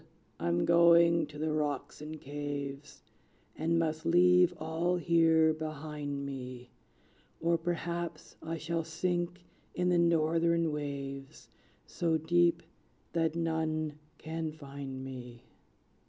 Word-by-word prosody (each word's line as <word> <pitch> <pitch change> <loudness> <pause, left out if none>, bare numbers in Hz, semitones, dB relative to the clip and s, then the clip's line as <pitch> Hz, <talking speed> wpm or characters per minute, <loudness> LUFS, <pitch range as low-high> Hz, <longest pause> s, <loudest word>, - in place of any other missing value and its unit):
I'm 85 +1 +1
going 170 -1 +5
to 150 0 -11
the 155 +1 -1
rocks 145 -2 -2
and 155 +1 -7
caves, 145 0 -6 0.5
And 165 +1 +1
must 160 -1 0
leave 180 +1 +5
all 160 +3 0
here 165 -2 +4
behind 150 -2 -5
me; 125 -2 -7 0.7
Or 170 +1 +2
perhaps 170 -1 -3
I 165 +1 -4
shall 165 +2 -2
sink 175 +2 -2 0.3
in 180 0 +1
the 175 -1 +3
Northern 165 0 +2
waves, 140 -2 -6 0.4
So 165 -2 0
deep 170 +2 +2 0.5
that 165 -1 +1
none 155 -2 -1 0.2
can 160 0 -4
find 140 -3 -7
me." 125 -2 -9
160 Hz, 110 wpm, -31 LUFS, 145-170 Hz, 0.7 s, going